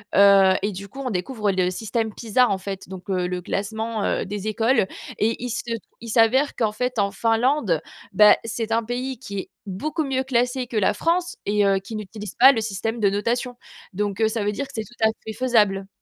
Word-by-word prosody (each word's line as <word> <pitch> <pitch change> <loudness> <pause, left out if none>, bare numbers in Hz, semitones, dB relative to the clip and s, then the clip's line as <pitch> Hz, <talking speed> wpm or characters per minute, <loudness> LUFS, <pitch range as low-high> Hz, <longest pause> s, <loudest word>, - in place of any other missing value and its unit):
Heu 195 -1 +7
et 205 - -1
du 200 +1 -8
coup, 270 - -12
on 260 - -2
découvre 210 +1 -1
le 185 -1 +1
système 220 +3 -2
PISA, 240 +3 +2
en 195 - 0
fait, 190 0 -6
donc, 190 0 -10
heu, 180 -2 0
le 180 0 -3
classement 220 +4 -3
heu, - - 0
des 205 +1 -5
écoles, 225 +1 +2 0.3
et 225 +3 0
il 245 - -3
se 235 - -2 0.4
il 230 - -8
s'avère 240 +6 +3
qu'en 220 -3 +1
fait, 250 +3 -3
en 200 -1 +1
Finlande, 225 - +1 0.3
bah, 210 +2 +7
c'est 230 0 -3
un 230 +1 +2
pays 250 +2 -4
qui 200 -6 -5
est - - -7 0.2
beaucoup 300 - -3
mieux 265 -1 0
classé 250 0 0
que 235 - -4
la 205 - +3
France 350 +2 0
et 205 0 +2
heu, 195 -1 +3
qui 195 +3 -8
n'utilise 210 -1 -8
pas 265 +3 +8
le 225 - -1
système 220 +2 -3
de 200 - +4
notation. 240 +5 -1 0.4
Donc, 205 +1 -2
heu, 220 - +4
ça 220 -2 -2
veut 210 - 0
dire 280 - -3
que - - -14
c'est 220 - -2
tout 225 +1 -2
à - - +5 0.2
fait 220 - -5
faisable. 210 -5 +2
220 Hz, 220 wpm, -23 LUFS, 200-245 Hz, 0.4 s, pas